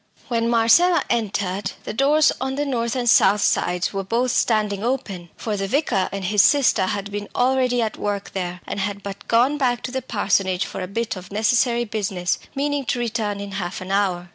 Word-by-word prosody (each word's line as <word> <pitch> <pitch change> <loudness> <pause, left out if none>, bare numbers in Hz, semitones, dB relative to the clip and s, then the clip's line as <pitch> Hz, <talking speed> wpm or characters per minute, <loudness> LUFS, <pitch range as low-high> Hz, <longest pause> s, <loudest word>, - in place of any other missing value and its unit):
When 230 -1 0
Marcella 240 +10 +4
entered, 200 -4 -1
the - - -5
doors 285 +5 +4
on 265 0 -2
the 290 +1 -1
north 235 -3 -1
and 245 -2 -2
south 205 -2 +5
sides 180 -1 0
were 195 0 -2
both 235 +5 0
standing 210 -4 +1
open, 200 -9 -3
for 215 -2 -3
the 195 -1 -2
vicar 240 -6 0
and 195 -1 -4
his 205 +2 +4
sister 270 -9 +3
had 200 +1 -3
been 205 0 -5
already 250 -1 +2
at 220 - -3
work 205 -1 -3
there, 180 -2 -4
and - - -4
had 200 0 -3
but 200 0 -8
gone 255 +6 +3
back 245 -3 0
to 250 - -4
the 260 0 -2
parsonage 195 -6 0
for - - -6
a 185 - -4
bit 230 +4 -3
of 185 0 -10
necessary 235 +3 +2
business, 195 -5 -2 0.2
meaning 285 0 -1
to 245 - -1
return 220 -4 -2
in 200 0 -6
half 190 -2 -4
an 185 +1 -7
hour. 185 -3 0
215 Hz, 200 wpm, -22 LUFS, 195-245 Hz, 0.2 s, south